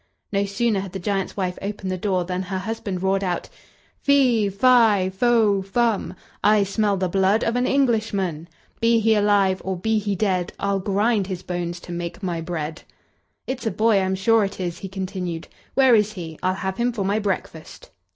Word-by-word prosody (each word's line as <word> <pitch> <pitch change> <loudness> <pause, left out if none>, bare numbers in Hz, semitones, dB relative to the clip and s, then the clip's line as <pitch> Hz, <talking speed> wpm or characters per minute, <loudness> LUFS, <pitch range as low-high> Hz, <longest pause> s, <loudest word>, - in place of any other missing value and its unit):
No 200 0 +1
sooner 210 +1 0
had 190 -1 -6
the - - -3
giant's 195 +1 -2
wife 180 -2 -2
opened 200 -1 -4
the - - -1
door 185 -2 0
than 180 +1 -2
her 190 0 -4
husband 195 -2 -4
roared 195 +1 +1
out: 180 -2 -2 0.5
"Fee, 255 -7 +3
fi, 210 -3 +4
fo, 215 -1 +3
fum, 205 -1 0 0.3
I 210 -1 +5
smell 200 0 0
the 185 0 0
blood 195 +4 +2
of 230 - 0
an 245 +1 +1
Englishman; 215 - 0 0.3
Be 230 0 +3
he 225 0 +3
alive, 205 -3 +2
or 190 -1 -2
be 220 +4 +1
he 205 -1 -2
dead, 185 -3 0
I'll 200 -1 0
grind 205 +1 +1
his 185 -2 -5
bones 175 -1 -4
to - - -10
make 170 +3 -5
my 175 -3 -2
bread!" 160 -2 -4 0.6
"It's 255 -3 -4
a - - +3
boy, 215 +1 +3
I'm 190 0 0
sure 220 +3 +3
it 195 - -4
is," 175 -2 -3
he 195 - -6
continued. 185 -3 -4 0.3
"Where 265 -2 +5
is 210 -1 +3
he? 165 -5 -8
I'll 185 0 +1
have 190 0 -4
him 240 +1 +1
for 210 -5 -3
my 200 +2 +1
breakfast." 190 -6 -5
195 Hz, 190 wpm, -23 LUFS, 185-220 Hz, 0.6 s, I